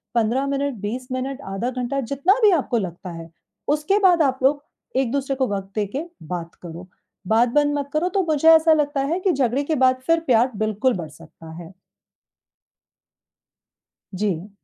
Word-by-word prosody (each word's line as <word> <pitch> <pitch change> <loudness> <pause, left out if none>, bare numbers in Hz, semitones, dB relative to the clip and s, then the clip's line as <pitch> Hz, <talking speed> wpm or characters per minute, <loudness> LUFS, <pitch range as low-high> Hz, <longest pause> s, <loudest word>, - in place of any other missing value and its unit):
15 235 +4 +1
minute, 280 0 -1
20 250 +5 -4
minute, 265 +2 -4
आधा 230 +6 -2
घंटा, 250 +2 -3
जितना 280 +9 +1
भी 415 - +7
आपको 275 -7 +1
लगता 180 -3 -5
है, 165 0 -9 0.4
उसके 300 +8 +1
बाद 360 -4 +4
आप 265 -2 +1
लोग 285 +2 +2 0.3
एक-दूसरे 270 +1 0
को 260 -1 0
वक़्त 195 0 -6
दे 210 -1 0
के 305 - -2 0.3
बात 170 -1 -6
करो। 175 +1 -9 0.4
बात 230 +3 +3
बंद 290 0 +2
मत 280 - -5
करो। 340 +4 +1
तो 385 +1 0
मुझे 315 0 +3
ऐसा 320 0 +6
लगता 290 -2 0
है 330 +6 -1
कि 375 0 +1
झगड़े 265 0 0
के 310 +2 -1
बाद, 255 -1 +3
फिर 330 0 +4
प्यार 245 +1 +3
बिल्कुल 215 +4 0
बढ़ 160 -3 -6
सकता 160 +1 -14
है। 170 +2 -12 2.4
जी। 190 -1 -2
260 Hz, 170 wpm, -22 LUFS, 210-290 Hz, 2.4 s, भी